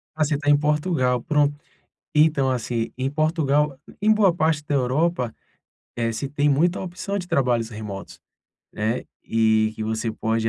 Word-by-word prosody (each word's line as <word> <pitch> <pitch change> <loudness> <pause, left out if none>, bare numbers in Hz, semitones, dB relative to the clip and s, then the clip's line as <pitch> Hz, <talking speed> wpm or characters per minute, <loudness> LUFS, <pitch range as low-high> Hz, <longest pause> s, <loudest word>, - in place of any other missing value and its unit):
Ah 155 - +2
você 150 0 +1
está 145 +1 -1
em 145 - +6
Portugal, 150 -4 +1
pronto, 145 +1 +1 0.6
então 150 -3 +4
assim, 120 -2 -2
em 130 +1 -1
Portugal, 150 -2 +1 0.2
em 215 +1 +4
boa 200 -5 +4
parte 155 -2 +1
da 145 - -1
Europa, 130 -1 0 0.6
eh, 115 -1 0
se 115 +5 -3
tem 145 +1 +1
muita 165 +6 +2
opção 190 +2 -4
de 180 -2 -5
trabalhos 120 -7 +1
remotos, 105 -3 -8 0.5
né, 110 +3 -1
eh - - -15 0.7
que 110 - -5
você 110 +1 -2
pode 110 0 -1
145 Hz, 160 wpm, -23 LUFS, 120-155 Hz, 0.7 s, em